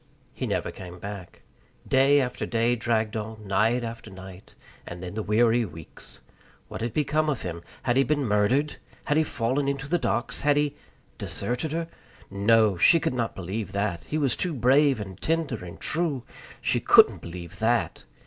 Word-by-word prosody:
He -, -, -4 dB
never -, -, -1 dB
came 90 Hz, -1 st, -10 dB
back. 100 Hz, -1 st, -9 dB, 0.4 s
Day 135 Hz, +2 st, +5 dB
after 125 Hz, -2 st, -2 dB
day 115 Hz, +1 st, +2 dB
dragged 115 Hz, -2 st, 0 dB
on, 110 Hz, 0 st, -5 dB
night 110 Hz, +5 st, +2 dB
after 115 Hz, 0 st, -6 dB
night, 95 Hz, 0 st, -12 dB, 0.3 s
and 85 Hz, +1 st, -7 dB
then 90 Hz, -, -6 dB
the 110 Hz, -, -2 dB
weary 115 Hz, +3 st, +3 dB
weeks. 80 Hz, -6 st, -11 dB, 0.5 s
What -, -, -6 dB
had 115 Hz, +1 st, -1 dB
become 155 Hz, +2 st, +1 dB
of 145 Hz, -, -2 dB
him? 85 Hz, -2 st, -5 dB, 0.2 s
Had 120 Hz, 0 st, +1 dB
he 135 Hz, -, +5 dB
been 145 Hz, +1 st, 0 dB
murdered? 115 Hz, +8 st, +1 dB, 0.3 s
Had 145 Hz, -, +1 dB
he 160 Hz, -, +4 dB
fallen 135 Hz, 0 st, -1 dB
into 140 Hz, 0 st, -2 dB
the 175 Hz, +4 st, +1 dB
docks? 120 Hz, -2 st, 0 dB
Had 145 Hz, 0 st, +3 dB
he 145 Hz, -1 st, +1 dB, 0.4 s
deserted 125 Hz, +6 st, -3 dB
her? 165 Hz, 0 st, -2 dB, 0.4 s
No! 105 Hz, 0 st, +3 dB
She 165 Hz, -, +6 dB
could -, -, -1 dB
not 120 Hz, -2 st, -2 dB
believe 95 Hz, +2 st, -5 dB
that; 100 Hz, -5 st, -2 dB
he 155 Hz, -, -2 dB
was 140 Hz, -6 st, +1 dB
too 175 Hz, -4 st, -2 dB
brave 135 Hz, +1 st, +4 dB
and 95 Hz, -2 st, -8 dB
tender 160 Hz, -, -1 dB
and 85 Hz, -1 st, -9 dB
true. 155 Hz, -6 st, -1 dB, 0.4 s
She -, -, +1 dB
couldn't -, -, +6 dB
believe 85 Hz, 0 st, -9 dB
that. 115 Hz, +2 st, 0 dB
115 Hz, 175 wpm, -26 LUFS, 100-140 Hz, 0.5 s, She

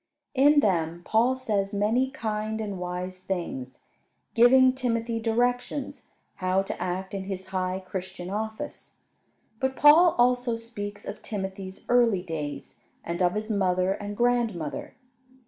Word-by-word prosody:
In 290 Hz, +2 st, +5 dB
them 170 Hz, -, 0 dB
Paul 235 Hz, +4 st, +3 dB
says 205 Hz, -5 st, -1 dB
many 225 Hz, +6 st, +2 dB
kind 220 Hz, -2 st, -3 dB
and 205 Hz, -4 st, -4 dB
wise 180 Hz, +1 st, -4 dB
things, 170 Hz, -9 st, -5 dB, 0.5 s
giving 255 Hz, +2 st, +6 dB
Timothy 230 Hz, -3 st, -1 dB
directions 245 Hz, +4 st, -1 dB, 0.3 s
how 185 Hz, +1 st, +1 dB
to -, -, -6 dB
act 185 Hz, +2 st, -3 dB
in 195 Hz, -1 st, -4 dB
his 190 Hz, -1 st, -5 dB
high 185 Hz, 0 st, -2 dB
Christian 185 Hz, -1 st, -6 dB
office. 220 Hz, +1 st, -5 dB, 0.6 s
But 265 Hz, 0 st, 0 dB
Paul 315 Hz, +5 st, +7 dB
also 245 Hz, -1 st, +2 dB
speaks 205 Hz, -3 st, -7 dB
of 210 Hz, -, -7 dB
Timothy's 190 Hz, -2 st, -6 dB
early 235 Hz, -7 st, +3 dB
days, 155 Hz, -4 st, -6 dB, 0.2 s
and 170 Hz, +2 st, -4 dB
of 180 Hz, +1 st, +2 dB
his 215 Hz, +1 st, -2 dB
mother 185 Hz, -2 st, +1 dB
and 205 Hz, +1 st, -6 dB
grandmother. 235 Hz, -10 st, 0 dB
205 Hz, 130 wpm, -27 LUFS, 185-240 Hz, 0.6 s, Paul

